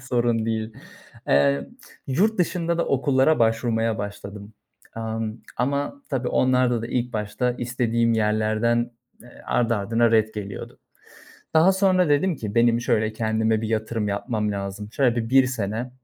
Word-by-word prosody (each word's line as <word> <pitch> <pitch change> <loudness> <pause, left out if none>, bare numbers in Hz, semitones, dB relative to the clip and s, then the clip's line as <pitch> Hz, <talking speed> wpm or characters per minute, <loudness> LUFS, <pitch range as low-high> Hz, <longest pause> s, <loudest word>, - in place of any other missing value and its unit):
Sorun 120 -3 0
değil. 110 0 -2 0.6
Eee, 70 0 +3 0.4
yurt 195 +11 +1
dışında 170 -1 0
da 170 - 0
okullara 135 +2 +2
başvurmaya 115 -1 +1
başladım, 100 0 -7 0.4
amm, 110 -1 -3 0.2
ama 140 - -2
tabii 130 -3 -1
onlarda 125 -2 +2
da - - -3
ilk 125 +1 -2
başta 110 +3 -1
istediğim 115 -1 0
yerlerden, 110 +2 +1 0.3
eee, 120 +1 -16
ardı 115 -1 +1
ardına 115 +3 +1
ret 110 -1 +2
geliyordu. 100 -2 -7 0.8
Daha 165 +4 +6
sonra 185 -2 +3
dedim 150 +4 +2
ki, 105 -4 -6
"Benim 120 0 +3
şöyle 110 -2 0
kendime 110 0 0
bir 110 - -3
yatırım 110 -1 -1
yapmam 105 +1 -2
lazım. 100 +1 -6
Şöyle 125 -4 +2
bir 115 -1 -2
1 135 0 +5
sene 115 0 -3
115 Hz, 140 wpm, -23 LUFS, 110-125 Hz, 0.8 s, Daha